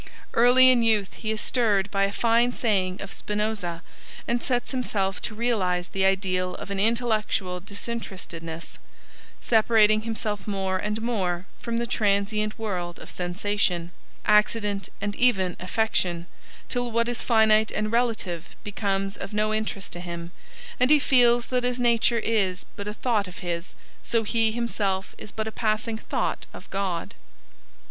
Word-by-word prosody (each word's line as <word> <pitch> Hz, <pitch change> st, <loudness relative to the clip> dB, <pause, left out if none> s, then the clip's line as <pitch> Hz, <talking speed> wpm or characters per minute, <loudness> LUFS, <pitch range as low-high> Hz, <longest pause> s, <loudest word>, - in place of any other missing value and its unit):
Early 250 Hz, +2 st, +7 dB
in 245 Hz, -2 st, +3 dB
youth 215 Hz, -4 st, +2 dB
he 215 Hz, -, -5 dB
is 220 Hz, -1 st, +1 dB
stirred 205 Hz, -5 st, +2 dB
by 195 Hz, -1 st, +2 dB
a 200 Hz, -, -2 dB
fine 235 Hz, +3 st, +3 dB
saying 190 Hz, -6 st, 0 dB
of 200 Hz, -, -7 dB
Spinoza, 210 Hz, -5 st, -2 dB, 0.4 s
and 235 Hz, 0 st, 0 dB
sets 245 Hz, -2 st, -1 dB
himself 200 Hz, -7 st, -1 dB
to 215 Hz, -, -4 dB
realise 190 Hz, -7 st, 0 dB
the 190 Hz, 0 st, 0 dB
ideal 185 Hz, -1 st, +1 dB
of 200 Hz, -, -7 dB
an 195 Hz, -, -2 dB
intellectual 215 Hz, -4 st, +1 dB
disinterestedness, 185 Hz, -5 st, -6 dB, 0.6 s
separating 215 Hz, -2 st, +4 dB
himself 215 Hz, -2 st, -3 dB
more 190 Hz, -2 st, -1 dB
and 210 Hz, +3 st, -2 dB
more 185 Hz, -7 st, -1 dB
from 230 Hz, -1 st, -3 dB
the 235 Hz, -, 0 dB
transient 210 Hz, -1 st, 0 dB
world 180 Hz, -6 st, -3 dB
of -, -, -11 dB
sensation, 180 Hz, -1 st, -1 dB, 0.3 s
accident 210 Hz, -1 st, +2 dB
and 205 Hz, 0 st, -3 dB
even 190 Hz, -8 st, +3 dB
affection, 185 Hz, -3 st, 0 dB, 0.4 s
till 245 Hz, -1 st, -1 dB
what 230 Hz, +1 st, +1 dB
is 240 Hz, -1 st, -2 dB
finite 220 Hz, -2 st, +4 dB
and 215 Hz, 0 st, -1 dB
relative 225 Hz, -8 st, 0 dB, 0.2 s
becomes 195 Hz, -1 st, -1 dB
of 200 Hz, -, -7 dB
no 215 Hz, +1 st, +1 dB
interest 215 Hz, -3 st, -3 dB
to 175 Hz, -, -5 dB
him, 170 Hz, -1 st, -6 dB, 0.5 s
and 250 Hz, -, +4 dB
he 305 Hz, -, +8 dB
feels 245 Hz, -4 st, +4 dB
that 250 Hz, -1 st, 0 dB
as 250 Hz, 0 st, -1 dB
nature 235 Hz, -1 st, +3 dB
is 205 Hz, -5 st, 0 dB
but 200 Hz, -, -6 dB
a 210 Hz, -, -3 dB
thought 220 Hz, -4 st, 0 dB
of 180 Hz, -, -10 dB
his, 170 Hz, +1 st, -4 dB, 0.3 s
so 230 Hz, -1 st, 0 dB
he 225 Hz, +1 st, +2 dB
himself 205 Hz, -5 st, -2 dB
is 210 Hz, -, -7 dB
but 220 Hz, 0 st, -3 dB
a -, -, -3 dB
passing 220 Hz, 0 st, -1 dB
thought -, -, -2 dB
of -, -, -11 dB
God. 190 Hz, -4 st, -2 dB
210 Hz, 155 wpm, -26 LUFS, 190-230 Hz, 0.6 s, he